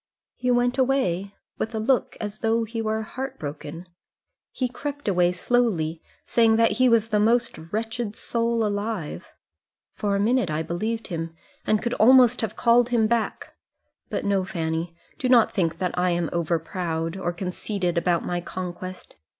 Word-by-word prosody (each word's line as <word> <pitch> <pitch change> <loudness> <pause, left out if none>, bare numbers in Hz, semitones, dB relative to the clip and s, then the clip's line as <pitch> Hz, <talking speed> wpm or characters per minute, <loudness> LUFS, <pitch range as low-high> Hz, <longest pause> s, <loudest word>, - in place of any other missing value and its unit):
"He 250 - -2
went 245 +1 +2
away, 200 -8 +1 0.2
with 225 - -2
a - - -1
look 250 +4 +1
as 210 0 -5
though 225 0 +1
he 225 +1 -4
were 220 0 -1
heart 265 +5 -6
broken. 150 +4 -7 0.6
He 255 - -2
crept 285 +2 -6
away 180 -3 +3
slowly, 180 -6 0 0.2
saying 225 -1 +4
that 230 0 +4
he 255 0 +6
was 225 -1 +3
the 210 -1 +2
most 230 +2 +2 0.2
wretched 225 0 -3
soul 230 -1 0
alive. 205 -5 -3 0.6
For 205 -1 -1
a - - +1
minute 225 -1 +2
I 155 +1 -1
believed 220 +8 -3
him, 165 -2 -4 0.3
and 215 -1 +2
could 240 0 -1
almost 250 +1 +6
have 220 -3 -3
called 235 0 +4
him 235 -3 +3
back. 230 0 -1 0.6
But, - - -3
no, 200 -2 +2
Fanny; 165 -2 -3 0.2
do 255 - 0
not 240 -3 +5
think 165 -4 0
that 180 0 -2
I 180 0 +2
am 170 -2 0
over 170 0 +1
proud, 165 -1 -3
or 185 -2 -2
conceited 180 0 -3
about 170 0 +1
my 175 0 -2
conquest. 185 +1 -7
210 Hz, 165 wpm, -25 LUFS, 175-235 Hz, 0.6 s, he